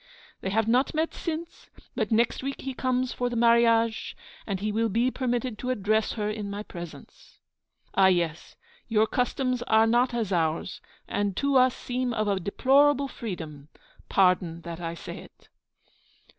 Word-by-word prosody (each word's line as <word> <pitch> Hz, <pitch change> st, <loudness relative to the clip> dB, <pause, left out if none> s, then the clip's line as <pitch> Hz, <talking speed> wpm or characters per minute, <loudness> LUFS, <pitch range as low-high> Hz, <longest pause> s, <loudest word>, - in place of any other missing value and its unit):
They 190 Hz, -, -2 dB
have 220 Hz, +2 st, +1 dB
not 250 Hz, +6 st, +2 dB
met 320 Hz, +1 st, 0 dB
since; 335 Hz, 0 st, -6 dB, 0.3 s
but -, -, -1 dB
next 230 Hz, +2 st, +2 dB
week 275 Hz, +1 st, -4 dB
he 265 Hz, -, -4 dB
comes 255 Hz, 0 st, -1 dB
for 245 Hz, 0 st, -1 dB
the 240 Hz, -, -4 dB
marriage, 230 Hz, -1 st, +3 dB, 0.3 s
and 195 Hz, -3 st, -2 dB
he 210 Hz, +2 st, -1 dB
will 225 Hz, +2 st, +1 dB
be 235 Hz, +5 st, +1 dB
permitted 245 Hz, -3 st, -2 dB
to 250 Hz, -, -4 dB
address 215 Hz, -2 st, +1 dB
her 210 Hz, -2 st, -2 dB
in 210 Hz, -1 st, -4 dB
my 205 Hz, +1 st, -5 dB
presence. 170 Hz, -7 st, -11 dB, 0.6 s
Ah, 190 Hz, -1 st, +5 dB
yes! 170 Hz, -3 st, 0 dB, 0.3 s
your 220 Hz, -1 st, +3 dB
customs 250 Hz, +2 st, -1 dB
are 220 Hz, 0 st, +5 dB
not 240 Hz, +2 st, +2 dB
as 220 Hz, -5 st, -1 dB
ours, 165 Hz, 0 st, -1 dB, 0.3 s
and 200 Hz, -2 st, -1 dB
to 280 Hz, 0 st, +1 dB
us 255 Hz, -1 st, +5 dB
seem 250 Hz, -1 st, -2 dB
of 215 Hz, -1 st, 0 dB
a 200 Hz, -2 st, +1 dB
deplorable 275 Hz, +8 st, +3 dB
freedom. 160 Hz, -, -7 dB, 0.4 s
Pardon 180 Hz, -3 st, +2 dB
that 170 Hz, 0 st, -7 dB
I 165 Hz, 0 st, -4 dB
say -, -, -8 dB
it.' -, -, -17 dB
225 Hz, 165 wpm, -27 LUFS, 195-250 Hz, 0.6 s, Ah